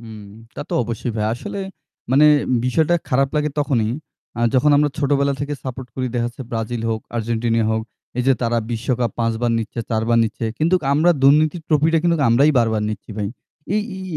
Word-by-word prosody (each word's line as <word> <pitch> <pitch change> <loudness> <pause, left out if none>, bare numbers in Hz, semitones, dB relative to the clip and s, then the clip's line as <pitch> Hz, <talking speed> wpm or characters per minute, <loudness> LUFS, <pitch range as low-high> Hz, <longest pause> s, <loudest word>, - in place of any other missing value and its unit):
হুম, 110 -2 -10 0.3
তা - - -5
তো - - -7
অবশ্যই 115 +1 -4
ভাই। 105 -1 0
আসলে 200 +11 -6 0.5
মানে 140 +3 +5 0.4
বিষয়টা 155 +6 +2
খারাপ 135 +1 +2
লাগে 150 0 +1
তখনই। 130 -7 +1 0.5
আ - - -1
যখন 140 +4 +4
আমরা 145 0 +3
ছোটবেলা 140 -1 +2
থেকে 145 +1 -2
সাপোর্ট 130 -1 -6
করি। 130 -1 -2
দেখা 120 -1 0
যাচ্ছে 130 +2 -9
ব্রাজিল 115 0 -3
হোক, 110 -1 -1 0.2
আর্জেন্টিনা 115 0 0
হোক, 110 0 0 0.4
এই - - +2
যে 135 - +6
তারা 115 0 +1
বিশ্বকাপ 120 0 -1
৫ 115 -1 +1
বার 120 - +2
নিচ্ছে, 115 +1 -5
৪ 110 -1 +1
-বার 115 0 +3
নিচ্ছে। 115 - -4
কিন্তু 165 +4 +2 0.2
আমরা 160 +4 +4
দুর্নীতির 155 +4 +4
ট্রফিটা 160 +1 +3
কিন্তু 170 -1 +2
আমরাই 135 +6 +5
বারবার 110 -2 +1
নিচ্ছি 110 +1 -6
ভাই। 105 -2 -2 0.5
এই 210 - +2
এই 190 - -7
125 Hz, 190 wpm, -20 LUFS, 115-150 Hz, 0.5 s, যে